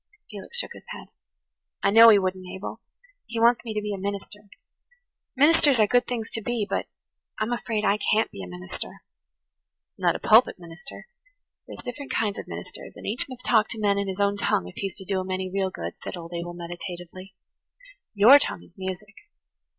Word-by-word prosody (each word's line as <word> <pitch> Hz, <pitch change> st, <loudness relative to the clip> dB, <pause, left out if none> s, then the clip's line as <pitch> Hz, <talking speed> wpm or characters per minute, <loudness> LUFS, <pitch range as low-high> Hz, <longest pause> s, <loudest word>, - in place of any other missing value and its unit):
Felix 210 Hz, -, -8 dB
shook -, -, -1 dB
his -, -, -12 dB
head. -, -, -9 dB, 0.7 s
"I 195 Hz, -, +4 dB
know 230 Hz, +2 st, +10 dB
he 215 Hz, -, +8 dB
wouldn't, 185 Hz, -1 st, -2 dB
Abel. 190 Hz, -, -7 dB, 0.5 s
He 230 Hz, -, -4 dB
wants 235 Hz, +1 st, +4 dB
me 225 Hz, -2 st, -5 dB
to 210 Hz, -, 0 dB
be 210 Hz, 0 st, -2 dB
a 195 Hz, -, -5 dB
minister. 200 Hz, +1 st, -6 dB, 0.9 s
Ministers 290 Hz, -2 st, +5 dB
are 215 Hz, -, +6 dB
good 245 Hz, +4 st, +2 dB
things 230 Hz, -3 st, -4 dB
to 225 Hz, -, -4 dB
be, 235 Hz, -1 st, -1 dB
but -, -, -2 dB, 0.5 s
I'm 220 Hz, +2 st, -1 dB
afraid 225 Hz, -3 st, -2 dB
I 210 Hz, +1 st, +3 dB
can't 220 Hz, +1 st, +2 dB
be 100 Hz, -, -8 dB
a 90 Hz, -, -7 dB
minister." 90 Hz, 0 st, -8 dB, 1.0 s
"Not -, -, +2 dB
a -, -, -3 dB
pulpit 225 Hz, +3 st, +5 dB
minister. 175 Hz, +8 st, -10 dB, 0.6 s
There's -, -, -9 dB
different 270 Hz, +3 st, -6 dB
kinds 210 Hz, -3 st, 0 dB
of -, -, -8 dB
ministers, -, -, -8 dB
and -, -, -10 dB
each 230 Hz, +6 st, 0 dB
must 255 Hz, -1 st, -10 dB
talk 220 Hz, -2 st, +4 dB
to 230 Hz, -, -4 dB
men 200 Hz, -1 st, +2 dB
in 200 Hz, -, -2 dB
his 190 Hz, 0 st, -4 dB
own 200 Hz, 0 st, +2 dB
tongue 90 Hz, -, +1 dB
if 90 Hz, -, -12 dB
he's 195 Hz, -3 st, -4 dB
going 190 Hz, -, -8 dB
to 195 Hz, -, -2 dB
do 190 Hz, -, +1 dB
'em 185 Hz, 0 st, -5 dB
any 185 Hz, 0 st, -2 dB
real 195 Hz, -1 st, +1 dB
good," -, -, -6 dB
said -, -, -5 dB
old 170 Hz, 0 st, -9 dB
Abel 175 Hz, 0 st, -5 dB
meditatively. 175 Hz, +2 st, -8 dB, 0.8 s
"Your 235 Hz, +8 st, +9 dB
tongue 180 Hz, -, -3 dB
is -, -, -19 dB
music. 190 Hz, +2 st, -5 dB
205 Hz, 200 wpm, -25 LUFS, 185-225 Hz, 1.0 s, know